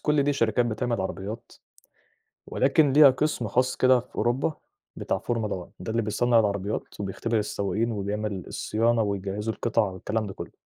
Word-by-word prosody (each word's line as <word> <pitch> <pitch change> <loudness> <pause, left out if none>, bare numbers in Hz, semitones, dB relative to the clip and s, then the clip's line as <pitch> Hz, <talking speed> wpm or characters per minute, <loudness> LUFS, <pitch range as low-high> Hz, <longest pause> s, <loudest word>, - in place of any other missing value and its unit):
كل 150 -1 +3
دي 145 +1 +1
شركات 120 -2 +1
بتعمل 115 0 -1
عربيات، 100 +4 -5 1.0
ولكن 145 -4 +3
ليها 145 -1 +9
قسم 130 -2 -1
خاص 125 +5 +1
كده 130 -1 +5
في 125 - -14
أوروبا، 125 +7 0 0.4
بتاع 95 - -2
Formula 115 -2 -2 0.2
one - - -24
ده 95 +4 -5
اللي 115 +1 +1
بيصنّع 115 +2 +2
العربيات، 100 -1 -1 0.2
وبيختبر 105 +3 -2
السواقين، 105 +2 -1
وبيعمل 105 -2 -3
الصيانة، 115 +1 +1
وبيجهّزوا 100 +1 -2
القطع 115 0 0
والكلام 105 +4 -3
ده 95 - -7
كلُّه. - - -8
110 Hz, 160 wpm, -26 LUFS, 100-120 Hz, 1.0 s, ليها